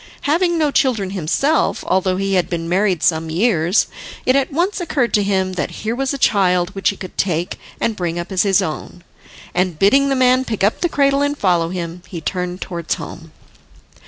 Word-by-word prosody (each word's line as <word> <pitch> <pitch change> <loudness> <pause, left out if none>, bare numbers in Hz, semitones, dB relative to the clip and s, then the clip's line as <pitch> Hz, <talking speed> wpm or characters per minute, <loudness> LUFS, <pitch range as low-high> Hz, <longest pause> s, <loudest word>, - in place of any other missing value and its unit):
Having 340 +4 +1
no 305 -3 +2
children 225 -9 +1
himself, 200 - 0
although 185 0 +1
he 195 0 -1
had 180 -2 +1
been 165 -2 -3
married 185 -1 +1
some 160 -1 +1
years, 175 0 +2 0.4
it 255 - +3
at 275 0 +1
once 355 +7 0
occurred 275 -8 0
to 210 - +4
him 190 -2 0
that 180 - -4
here 220 - 0
was 270 +1 -1
a 280 - -3
child 185 -7 +2
which 195 -1 0
he 200 - -4
could 185 - -9
take 175 -2 -1 0.2
and 225 - 0
bring 175 -3 -3
up 175 +3 -5
as 185 - +2
his 195 -2 +3
own. 165 +2 -6 0.5
And, 180 -3 0
bidding 275 - +4
the 270 - +1
man 255 0 +4
pick 220 -6 -3
up 205 - +1
the 345 - +1
cradle 275 -2 +2
and 285 0 0
follow 175 -6 +1
him, 175 -1 -5
he 175 - -6
turned 180 +2 -3
towards 170 -3 -3
home. - - -9
195 Hz, 200 wpm, -19 LUFS, 175-260 Hz, 0.5 s, to